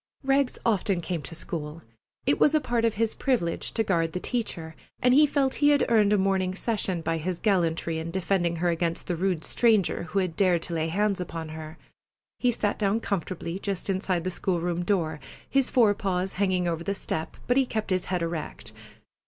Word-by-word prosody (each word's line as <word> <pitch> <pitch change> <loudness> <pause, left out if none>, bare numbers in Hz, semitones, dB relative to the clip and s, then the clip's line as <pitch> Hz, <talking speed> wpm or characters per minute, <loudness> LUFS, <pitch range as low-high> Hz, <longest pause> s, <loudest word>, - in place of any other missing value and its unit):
Rags 270 -1 +2
often 200 -4 +1
came 175 -1 -3
to 145 +4 -8
school. 160 -1 -5 0.4
It 280 - +2
was 300 - +5
a - - +5
part 240 -5 0
of 225 - +1
his 225 +1 +1
privilege 230 -12 -1
to 225 - +1
guard 165 -5 0
the 180 - -2
teacher, 175 -9 -3 0.2
and 250 0 +4
he 300 +3 +7
felt 275 -2 +1
he 290 - +6
had 290 -1 +4
earned 215 -3 +4
a 210 - +4
morning 190 -1 +1
session 195 -5 -1
by 165 0 -1
his 175 +2 -3
gallantry 170 -5 +1
in 160 +1 -4
defending 175 -1 0
her 175 +1 +1
against 170 0 -1
the 180 - -1
rude 180 -2 -1
stranger 215 -7 +2
who 200 - -3
had 185 -4 0
dared 180 -3 +3
to 175 - -6
lay 160 -1 0
hands 200 +2 0
upon 165 -2 -5
her. 155 0 -8 0.6
He 250 - +3
sat 210 -3 -1
down 205 +1 +2
comfortably 185 -3 -3
just 200 -1 -2
inside 185 -2 -1
the 185 - -2
school 180 0 -1
room 175 0 -1
door, 165 -5 0 0.3
his 275 -2 +2
forepaws 195 -5 +2
hanging 185 -2 +1
over 165 -1 -2
the 200 +3 -1
step, 160 -4 -4
but 245 - +2
he 265 -1 +3
kept 220 -3 -3
his 185 -1 +1
head 180 -2 -1
erect. 160 -8 -5
185 Hz, 200 wpm, -27 LUFS, 170-215 Hz, 0.6 s, he